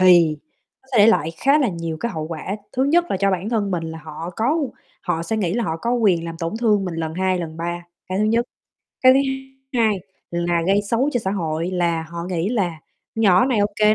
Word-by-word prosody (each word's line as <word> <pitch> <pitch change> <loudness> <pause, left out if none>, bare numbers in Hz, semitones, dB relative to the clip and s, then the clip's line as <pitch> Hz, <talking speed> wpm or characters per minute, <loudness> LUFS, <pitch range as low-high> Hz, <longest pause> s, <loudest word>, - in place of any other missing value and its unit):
thì 175 -4 +6 0.5
nó 265 - -28
sẽ 240 - +3
để 205 - +8
lại 165 -8 +3
khá 275 - +4
là 275 -5 +2
nhiều 165 -3 -4
cái 235 - -2
hậu 160 -3 -3
quả, 170 +5 -4 0.2
thứ 260 - +1
nhất 335 +5 +4
là - - +1
cho 195 +1 +2
bản 190 +2 -1
thân 215 -4 0
mình 170 -3 -1
là 160 0 -6
họ 160 +2 -7
có 275 +9 +2 0.4
họ 165 -2 -1
sẽ 220 +6 -2
nghĩ 185 -4 0
là 235 -1 0
họ 160 - -2
có 235 +9 -2
quyền 195 -8 +2
làm 165 -1 -5
tổn 165 +3 -3
thương 210 -4 +3
mình 180 - -4
lần 160 -1 -3
2, 185 0 +1
lần 160 -2 -5
3, 175 +1 -4 0.2
cái 185 +1 -1
thứ 210 - +2
nhất. 230 +2 +2 0.6
Cái 255 0 +8
thứ 265 - +4
hai 265 0 -6 0.3
hai 205 -3 0 0.3
là 170 0 0
gây 195 +2 +4
xấu 245 +5 +2
cho 245 - +1
xã 190 - -2
hội 165 -2 -2
là 170 -2 0
họ 170 +1 -6
nghĩ 180 0 -1
là 185 -9 -1 0.3
"Nhỏ 200 -4 +5
này 255 -4 +1
ô 205 - +4
kê 215 0 +5
185 Hz, 245 wpm, -21 LUFS, 170-225 Hz, 0.6 s, để